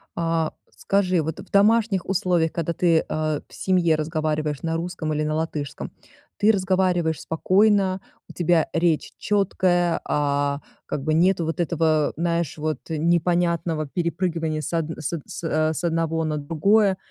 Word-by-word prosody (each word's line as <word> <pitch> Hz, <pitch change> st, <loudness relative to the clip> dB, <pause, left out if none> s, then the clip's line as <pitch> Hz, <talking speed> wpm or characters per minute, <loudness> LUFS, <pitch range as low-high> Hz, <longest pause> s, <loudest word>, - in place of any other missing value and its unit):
А, 165 Hz, -1 st, 0 dB, 0.2 s
скажи, 185 Hz, -3 st, +1 dB
вот 160 Hz, 0 st, -4 dB
в -, -, -11 dB
домашних 205 Hz, -1 st, +3 dB
условиях, 175 Hz, -3 st, +1 dB
когда 170 Hz, 0 st, -2 dB
ты, 165 Hz, -1 st, +2 dB
а, 155 Hz, -1 st, -1 dB
в -, -, -21 dB
семье 180 Hz, -4 st, +2 dB
разговариваешь 155 Hz, -1 st, -2 dB
на 165 Hz, -1 st, -2 dB
русском 170 Hz, -1 st, -3 dB
или 150 Hz, 0 st, -1 dB
на 155 Hz, 0 st, -1 dB
латышском- 155 Hz, -3 st, -4 dB, 0.5 s
ты 210 Hz, +2 st, +5 dB
разговариваешь 185 Hz, -4 st, +1 dB
спокойно, 190 Hz, +2 st, +2 dB, 0.3 s
у -, -, -12 dB
тебя 170 Hz, -2 st, +2 dB
речь 165 Hz, -1 st, +1 dB
чёткая, 180 Hz, -4 st, +1 dB
а, 145 Hz, 0 st, 0 dB, 0.3 s
как 135 Hz, -, -3 dB
бы 155 Hz, +2 st, 0 dB
нету 175 Hz, +1 st, +3 dB
вот 160 Hz, +2 st, -3 dB
этого, 160 Hz, -2 st, +1 dB
знаешь, 170 Hz, -2 st, -1 dB
вот 155 Hz, -2 st, -2 dB
непонятного 170 Hz, -1 st, +1 dB
перепрыгивания 165 Hz, -1 st, -2 dB
с 150 Hz, -, -6 dB
одн 165 Hz, -1 st, -2 dB
с 155 Hz, -, -4 dB
од 165 Hz, -, -3 dB
с, -, -, -8 dB
а, 155 Hz, -1 st, +1 dB
с 155 Hz, -, -5 dB
одного 165 Hz, -1 st, 0 dB
на 155 Hz, -1 st, -1 dB
другое? 190 Hz, +7 st, +2 dB
165 Hz, 155 wpm, -23 LUFS, 155-180 Hz, 0.5 s, ты